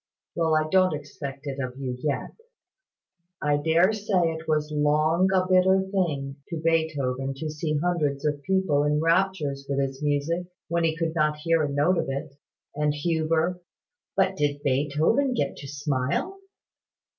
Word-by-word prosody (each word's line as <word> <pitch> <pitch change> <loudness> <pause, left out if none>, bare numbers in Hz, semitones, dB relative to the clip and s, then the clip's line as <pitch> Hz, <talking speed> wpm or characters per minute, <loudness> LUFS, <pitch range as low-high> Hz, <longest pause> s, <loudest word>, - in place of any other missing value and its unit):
Well, 165 -2 +1
I 155 0 +2
don't 185 0 +3
expect 145 -1 -8
it 140 -1 -4
of 130 -1 -4
you 130 -2 -3
yet. 145 -1 -2 1.1
I 145 -1 +1
dare 165 +7 +3
say 195 -5 +1
it 160 0 -7
was 150 -1 0
long 155 +4 +2
a 185 -1 +3
bitter 185 +1 +5
thing 170 -8 -2
to 170 - -4
Beethoven 145 -5 0
to 155 +2 -4
see 150 0 -2
hundreds 150 -4 0
of 145 -1 0
people 175 -3 +1
in 150 0 +1
raptures 165 -5 +1
with 140 - -1
his 135 0 -2
music, 150 +4 0 0.2
when 170 0 +1
he 160 0 0
could 165 -1 -1
not 150 -2 +1
hear 165 +1 +1
a 150 - 0
note 150 +6 +2
of 160 - -2
it. 140 +1 -4 0.4
And 150 0 0
Huber 165 +3 0 0.2
" 485 - -65
"But 190 - +3
did 145 -2 -1
Beethoven 150 - +1
get 140 - -1
to 140 - -8
smile?" 145 - -2
155 Hz, 165 wpm, -26 LUFS, 145-170 Hz, 1.1 s, bitter